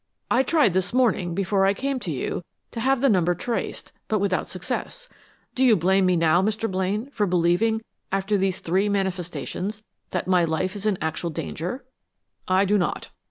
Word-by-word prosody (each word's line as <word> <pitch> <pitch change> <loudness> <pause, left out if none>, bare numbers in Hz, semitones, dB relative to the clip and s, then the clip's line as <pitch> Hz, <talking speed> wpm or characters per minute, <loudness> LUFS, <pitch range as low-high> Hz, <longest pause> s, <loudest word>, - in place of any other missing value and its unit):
I 245 - +5
tried 275 - +3
this 190 +4 0
morning, 210 -9 +2
before 195 +1 +1
I 195 +1 +3
came 270 +3 -2
to 190 - -6
you, 150 +4 -3 0.3
to 230 - -5
have 265 +2 +2
the 275 - +4
number 175 -6 +3
traced, 230 +7 -4 0.2
but 215 - +1
without 195 -2 0
success. - - -5 0.5
Do 260 - +1
you 245 -4 +6
blame 190 +2 +3
me 180 - +3
now, 165 +1 +4
Mr. 215 +3 0
Blaine, 195 +7 -1
for 210 -6 0
believing, 180 +6 +2 0.3
after 195 +2 0
these 190 -2 0
three 190 +5 +1
manifestations, 195 +1 -3 0.3
that 180 - -2
my 180 -2 +4
life 170 +4 -1
is 205 +1 -3
in 205 -3 +1
actual 160 +2 -2
danger?" 180 - -5 0.6
"I 185 +2 +3
do 205 +1 +3
not." 175 - -2
195 Hz, 180 wpm, -24 LUFS, 180-220 Hz, 0.6 s, you